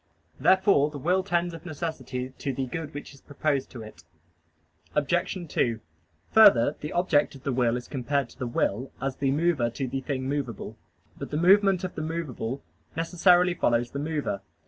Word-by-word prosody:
Therefore 190 -6 +4
the 150 - -8
will 180 +7 +1
tends 175 -2 -1
of 165 - -9
necessity 130 -6 -5
to 140 - -2
the 130 0 -2
good 155 +4 -5
which 145 - -7
is 140 - -17
proposed 145 -1 -1
to 120 -3 -9
it. 100 -4 -13 0.9
Obj. 170 +6 0
2: 115 -5 0 0.5
Further, 145 - +6
the 150 - -5
object 170 -5 +2
of 135 - -13
the 135 - -1
will 120 -1 +2
is 125 - -8
compared 140 0 -1
to - - -18
the 125 - -2
will 120 +1 -1
as 135 0 -3
the 135 - 0
mover 145 -4 +1
to 130 +3 -4
the 135 +2 -3
thing 130 -1 -3
movable. 135 -6 -4 0.4
But - - -6
the 150 - -2
movement 190 +2 +4
of 185 - -3
the 155 - -5
movable 145 -6 -4 0.3
necessarily 175 +2 +3
follows 120 -7 +1
the 140 - -4
mover. 150 -9 -2
145 Hz, 180 wpm, -27 LUFS, 130-170 Hz, 0.9 s, Further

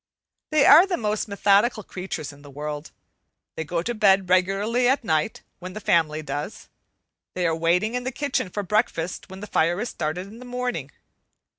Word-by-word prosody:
They 305 -2 +4
are 335 +6 +8
the 365 - -1
most 215 -1 -1
methodical 205 +2 +2
creatures 180 -7 -6
in 145 - -16
the 145 - -13
world. 150 +2 -6 0.7
They 160 - -3
go 170 +2 -2
to 240 - -2
bed 195 -4 +3
regularly 200 +7 +2
at 265 0 +1
night 160 0 -1 0.2
when 185 +1 -8
the 215 - -6
family 155 -5 +1
does. 145 +6 -6 0.7
They 180 -1 0
are 165 -1 +2
waiting 175 +7 +1
in 250 0 -2
the 260 - -3
kitchen 265 -8 -2
for 205 +3 -4
breakfast 190 -4 -1
when 190 +1 -10
the - - -5
fire 175 -2 +1
is 240 +2 -2
started 155 +4 -3
in 215 +4 -12
the - - -10
morning. 245 - -3
190 Hz, 185 wpm, -24 LUFS, 165-230 Hz, 0.7 s, are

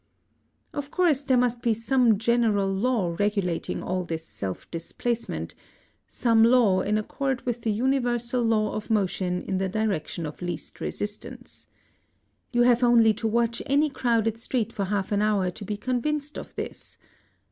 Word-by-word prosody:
Of 285 -1 -4
course 315 -5 +2
there 260 -2 +3
must 245 -1 +1
be 230 -2 +2
some 230 -1 +3
general 220 -3 +2
law 195 -5 0
regulating 200 -5 -1
all 185 0 -1
this 165 -2 -5
self 95 -2 -6
displacement, 225 +8 -3 0.5
some 230 -2 +3
law 230 -6 +5
in 210 +2 +1
accord 265 +4 -2
with 240 -1 -2
the 225 - 0
universal 245 +1 0
law 220 -2 +1
of 215 - -5
motion 185 -4 0
in 190 -1 -2
the 190 0 -1
direction 195 -5 -2
of 150 +3 -8
least 175 0 -6
resistance. 235 +4 -6 0.8
You 240 -1 +3
have 245 0 +4
only 230 -2 +6
to 225 +2 -2
watch 235 +1 0
any 290 +2 +3
crowded 230 -4 0
street 235 -2 -2
for 200 - -2
half 200 0 -2
an 205 0 +2
hour 205 -4 +1
to 205 - -9
be 205 +1 -4
convinced 285 +6 -1
of - - -8
this. - - -7
225 Hz, 160 wpm, -26 LUFS, 200-245 Hz, 0.8 s, only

